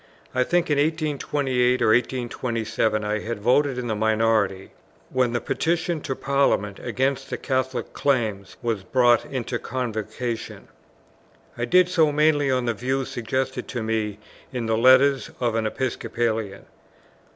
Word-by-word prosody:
I 130 0 +2
think 175 +3 +1
in 145 - +3
1828 145 -5 +1
or - - +3
1827 115 -2 0
I 105 +1 -1
had 115 0 -4
voted 130 +4 +2
in 125 - -3
the 115 - -1
minority, 110 -3 +1 0.4
when 130 -2 +1
the 120 - +1
Petition 165 +2 -1
to 135 - -3
Parliament 135 -9 +1
against 135 +1 -1
the - - -3
Catholic 130 -1 -2
Claims 110 -8 -1
was 115 -4 -1
brought 120 +1 +3
into 125 -2 -3
Convocation. 115 -1 -4 0.9
I 120 - -2
did 180 +8 +5
so 165 -4 +3
mainly 145 -1 +3
on 130 -2 +1
the 120 - +1
views 130 +4 -2
suggested 130 +3 -3
to 120 -4 -4
me 110 -2 -1 0.3
in 125 -3 -3
the 110 0 +1
Letters 130 +3 +5
of 120 -2 0
an 110 -1 0
Episcopalian. 115 -4 -2
125 Hz, 140 wpm, -24 LUFS, 110-135 Hz, 0.9 s, did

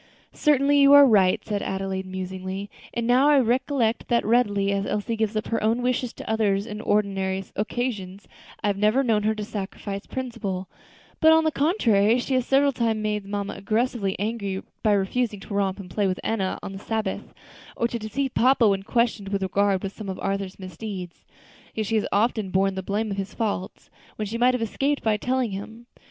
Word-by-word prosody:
"Certainly, 285 -1 +3
you 280 0 +7
are 285 0 +10
right," 195 -7 +3
said 205 -2 -2
Adelaide, 190 0 -3
musingly. 190 +1 -5 0.2
"And 235 -1 -2
now 255 +4 +4
I 295 - +6
recollect 245 -1 +1
that, 235 -1 +1
readily 205 -4 +2
as 200 0 -1
Elsie 220 +3 -2
gives 220 -1 -1
up 215 - -1
her 230 - 0
own 230 +3 +1
wishes 250 -1 0
to - - -10
others 210 -3 +1
on 210 0 -6
ordinary 195 -3 0
occasions, 210 -3 -3 0.4
I - - -1
have 200 -1 +1
never 215 +6 +3
known 225 -4 +2
her 215 +1 +1
to 215 - -4
sacrifice 200 -1 -6
principle; 230 -8 -4 0.5
but, 320 0 +6
on 320 0 +5
the 315 - +2
contrary, 240 - +3
she 255 +2 -2
has 255 -1 +1
several 280 +1 +4
times 230 -4 0
made 210 -2 -2
mamma 205 0 -3
excessively 215 0 -1
angry 200 -2 -3 0.2
by 215 - +3
refusing 205 +2 0
to 205 - -8
romp 195 -1 0
and 195 - -8
play 205 +2 +1
with 185 -1 -2
Enna 195 -4 -1
on - - -5
the 195 - -7
Sabbath, 220 +1 -3 0.5
or 235 - +1
to 235 0 -4
deceive 255 +5 -3
papa 255 -2 +4
when 195 -1 +2
questioned 225 -1 0
with 195 -1 -1
regard 195 0 +1
to 195 - -2
some 205 -1 -8
of 190 - -4
Arthur's 195 -1 -3
misdeeds; 185 0 -7 0.5
yet 220 - -1
she 225 - -1
has 210 - 0
often 215 -1 +1
borne 195 +1 +2
the 190 - -4
blame 205 +3 -2
of 195 - -3
his 195 +1 -5
faults, 205 -5 -3 0.2
when 215 - -3
she 225 +3 -4
might 250 +1 +4
have 240 - -1
escaped 275 +6 -1
by 220 -1 +2
telling 250 -1 -1
of 195 - -4
him. 230 +2 -15
215 Hz, 200 wpm, -25 LUFS, 195-240 Hz, 0.5 s, are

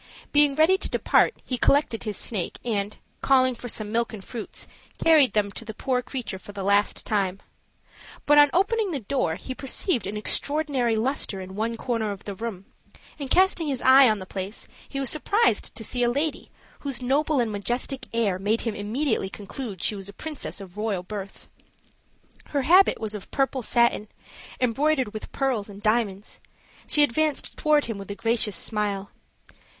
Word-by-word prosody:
Being 290 -1 +4
ready 325 +5 +4
to - - -4
depart, - - +3
he 250 - -2
recollected 245 -3 +2
his 210 -2 -2
snake, 200 -7 -2
and, 210 -3 -1 0.2
calling 255 -1 +4
for 245 +1 -7
some 215 -2 -3
milk 235 +1 0
and 200 -3 -8
fruits, 230 -4 -6 0.3
carried 310 -5 +5
them 205 -1 +1
to 230 - -8
the 220 -2 -8
poor 255 +1 0
creature 245 -7 -5
for 205 - -12
the 200 -1 -5
last 200 +1 +2
time; 195 -3 0 0.9
but 295 0 +6
on 290 0 +7
opening 410 +3 +1
the 290 -7 -3
door 210 -7 -1
he 260 - -6
perceived 270 - -1
an 210 - -4
extraordinary 275 0 0
luster 220 -3 -1
in 190 0 -8
one 225 +2 -2
corner 230 -3 -1
of 200 -1 -8
the 200 - -5
room, 195 -2 -6 0.5
and 275 -2 -5
casting 365 -2 +3
his 265 -3 -2
eye 260 -1 +8
on 215 - +1
the 190 - -7
place 190 +3 -6 0.2
he 275 - -4
was 270 -2 +1
surprised 405 +9 +2
to 225 - -3
see 245 +3 -2
a 240 - +3
lady, 290 +5 -2 0.3
whose 270 -3 -1
noble 285 +3 +2
and 230 -3 +1
majestic 240 +6 -2
air 210 -5 0
made 210 +4 0
him 230 - -2
immediately 220 +1 -1
conclude 205 0 -7
she - - +3
was 200 -1 -6
a - - -10
princess 305 -3 -6
of 195 -1 -11
royal 210 -4 -1
birth. 195 0 -8 1.0
Her 280 -2 -1
habit 365 +8 +5
was 220 -1 -3
of 205 -2 -7
purple 270 -1 0
satin, 235 -2 +2 0.5
embroidered 260 0 +1
with 215 - -7
pearls 250 -7 -1
and 200 0 -10
diamonds; 210 -2 -1 0.5
she 295 - +4
advanced 300 +2 0
toward 300 -1 +3
him 225 -3 -5
with 195 - -9
a 200 - -4
gracious 225 -2 0
smile. 205 0 -2
235 Hz, 180 wpm, -25 LUFS, 205-275 Hz, 1.0 s, eye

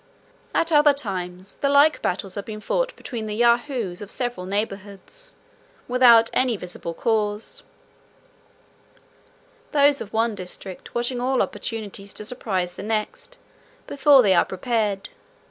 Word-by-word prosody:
At 330 - +2
other 295 -2 +5
times, 185 -6 -6
the 280 - 0
like 285 +2 +5
battles 185 +1 -2
have 200 - -5
been 215 -1 -6
fought - - -1
between 225 -4 -6
the 210 - -3
Yahoos 235 -4 +1
of 205 - -8
several 245 -8 -3
neighbourhoods, 205 - -5 0.5
without 240 -2 +6
any 250 -4 +2
visible 175 -2 -7
cause; 220 - -1 2.1
those 285 -1 +4
of 210 - -7
one 225 0 +1
district 185 -1 -9
watching 240 +1 -1
all 260 +1 +1
opportunities 205 -3 -4
to 210 - -5
surprise 190 -7 -2
the - - -8
next, 225 - -3 0.5
before 280 -2 +5
they 195 -3 +4
are 175 - +5
prepared. 205 0 -2
225 Hz, 130 wpm, -23 LUFS, 195-260 Hz, 2.1 s, without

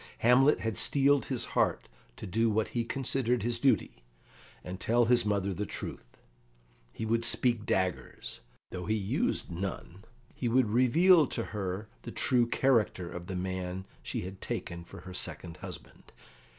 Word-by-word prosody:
Hamlet 130 +4 +5
had 110 -4 -2
steeled 140 0 +3
his 130 -4 -1
heart - - +1 0.3
to - - -7
do 115 +5 +1
what 110 0 0
he 120 - -1
considered 125 -2 0
his 120 0 0
duty, 115 - +1 0.6
and 90 +1 -6
tell 120 +2 +3
his 120 -1 +3
mother 100 -1 0
the 100 - -3
truth. - - -7 0.7
He 110 - -5
would 115 +1 +1
speak 115 -1 +3
daggers, 90 -9 -2 0.3
though 90 0 -5
he 110 - +2
used 100 -3 -1
none; 90 +1 -5 0.3
he 125 - -3
would 115 -2 +3
reveal 155 - +5
to 115 - -3
her 100 0 -3
the - - -8
true 120 -2 +2
character 110 -9 +1
of 90 0 -7
the 95 - -4
man 95 0 -3 0.2
she - - -3
had 95 +1 -8
taken 85 0 -4
for 85 - -12
her 90 0 -9
second 85 -2 -5
husband. - - -10
110 Hz, 160 wpm, -30 LUFS, 95-120 Hz, 0.7 s, Hamlet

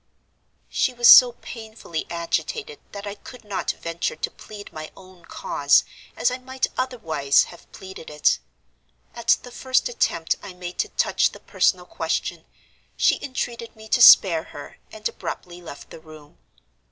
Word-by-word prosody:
"She 255 - 0
was 240 0 +4
so 245 -1 +10
painfully 220 -8 -7
agitated 420 - -3
that 200 0 -8
I 205 - -5
could 240 +4 -13
not 205 -2 -3
venture 170 -1 -3
to - - -4
plead 205 -1 -12
my 155 0 -7
own 185 -2 -16
cause 140 -3 +2 0.3
as 245 - +2
I 250 - -4
might 260 +1 -2
otherwise 160 - +1
have 175 - -14
pleaded 190 -4 -10
it. 150 -1 +2 0.7
At 235 -1 +2
the 245 - -11
first 260 +1 0
attempt 165 -8 0
I 190 - -9
made 180 0 -8
to - - 0
touch - - +1
the - - -12
personal - - 0
question, - - -3 0.5
she - - +2
entreated 235 -3 -5
me 220 0 -13
to 245 - +2
spare 170 -8 +8
her, 145 - -11
and 215 0 -3
abruptly 180 -1 -7
left 160 -4 -11
the - - -10
room. 155 -2 -16
200 Hz, 155 wpm, -23 LUFS, 165-240 Hz, 0.7 s, so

